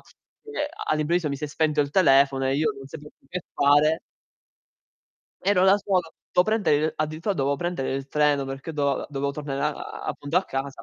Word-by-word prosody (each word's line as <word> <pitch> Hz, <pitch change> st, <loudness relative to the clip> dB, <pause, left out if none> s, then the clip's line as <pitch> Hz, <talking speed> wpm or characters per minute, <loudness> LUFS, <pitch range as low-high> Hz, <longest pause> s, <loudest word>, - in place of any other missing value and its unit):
che 425 Hz, -10 st, -8 dB, 0.2 s
all'improvviso 155 Hz, +2 st, +1 dB
mi 140 Hz, -, -3 dB
si 150 Hz, -, -5 dB
è -, -, -2 dB
spento 150 Hz, 0 st, +1 dB
il 140 Hz, -1 st, 0 dB
telefono 135 Hz, -5 st, +4 dB
e 135 Hz, -, +1 dB
io 150 Hz, 0 st, +2 dB
non 135 Hz, -, -10 dB
sapevo 150 Hz, +1 st, -10 dB
più -, -, -29 dB
che 180 Hz, +2 st, -4 dB
fare 145 Hz, +3 st, +4 dB, 1.4 s
ero 190 Hz, -1 st, +3 dB
da 195 Hz, +1 st, +6 dB
solo, 185 Hz, -5 st, -1 dB, 0.2 s
do 180 Hz, -, +5 dB
prendere 215 Hz, -7 st, +2 dB
il 155 Hz, +2 st, 0 dB
addirittura 155 Hz, +6 st, -2 dB
dovevo 140 Hz, -2 st, 0 dB
prendere 175 Hz, -5 st, -2 dB
il 135 Hz, 0 st, -5 dB
treno 145 Hz, -1 st, +2 dB
perché 135 Hz, +4 st, -6 dB
do 140 Hz, -3 st, 0 dB
dovevo 140 Hz, -1 st, -2 dB
tornare 140 Hz, -1 st, -4 dB
a 150 Hz, -, +1 dB
a -, -, -8 dB
appunto 145 Hz, +4 st, -3 dB
a 185 Hz, -, +3 dB
casa, 135 Hz, -3 st, -5 dB
150 Hz, 195 wpm, -25 LUFS, 140-175 Hz, 1.4 s, da